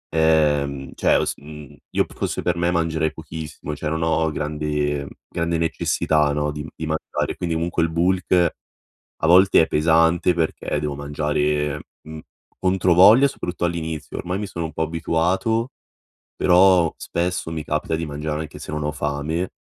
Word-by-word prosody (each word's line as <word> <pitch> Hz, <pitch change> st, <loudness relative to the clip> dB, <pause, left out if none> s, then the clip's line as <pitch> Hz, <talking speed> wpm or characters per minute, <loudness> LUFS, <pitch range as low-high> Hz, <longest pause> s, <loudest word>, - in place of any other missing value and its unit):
uhm, 75 Hz, -4 st, +2 dB
cioè -, -, +3 dB
ho -, -, +3 dB
s -, -, -1 dB
io 75 Hz, -1 st, -5 dB
fosse -, -, -3 dB
per 90 Hz, -, +1 dB
me 85 Hz, 0 st, +1 dB
mangerei 80 Hz, -2 st, 0 dB
pochissimo, 80 Hz, -1 st, -7 dB
cioè 75 Hz, +1 st, -5 dB
non 80 Hz, +1 st, -1 dB
ho 80 Hz, 0 st, +1 dB
grande 75 Hz, -1 st, -2 dB, 0.2 s
grande 85 Hz, 0 st, -1 dB
necessità 80 Hz, -2 st, +1 dB
no, 75 Hz, 0 st, -1 dB
di 75 Hz, +1 st, -6 dB
di 80 Hz, -, -5 dB
mangiare. 80 Hz, 0 st, -2 dB
Quindi 85 Hz, -2 st, -2 dB
comunque, 85 Hz, +1 st, -1 dB
il 80 Hz, -, +1 dB
bulk 90 Hz, 0 st, +2 dB, 0.7 s
a -, -, +3 dB
volte 95 Hz, +2 st, +6 dB
è 80 Hz, -, +2 dB
pesante 80 Hz, +3 st, +3 dB
perché, 80 Hz, -2 st, -2 dB
devo 75 Hz, -1 st, -3 dB
mangiare, 75 Hz, 0 st, -1 dB, 0.2 s
mhmm, 80 Hz, 0 st, -9 dB, 0.4 s
controvoglia 95 Hz, +7 st, +5 dB
soprattutto 90 Hz, -9 st, -4 dB
all'inizio. 80 Hz, -3 st, -4 dB
Ormai 90 Hz, +2 st, -3 dB
mi 105 Hz, -, -4 dB
sono 85 Hz, -3 st, -4 dB
un 80 Hz, -, -7 dB
po' 80 Hz, -, -4 dB
abituato 85 Hz, +8 st, 0 dB, 0.7 s
però, 90 Hz, -2 st, +5 dB
spesso 90 Hz, -1 st, -2 dB
mi 80 Hz, -2 st, -4 dB
capita 75 Hz, +1 st, -1 dB
di 80 Hz, 0 st, -3 dB
mangiare 75 Hz, +1 st, -4 dB
anche 80 Hz, -, -9 dB
se -, -, -7 dB
non 75 Hz, 0 st, -2 dB
ho 75 Hz, -, -1 dB
fame, 75 Hz, +5 st, -2 dB
80 Hz, 160 wpm, -22 LUFS, 75-85 Hz, 0.7 s, volte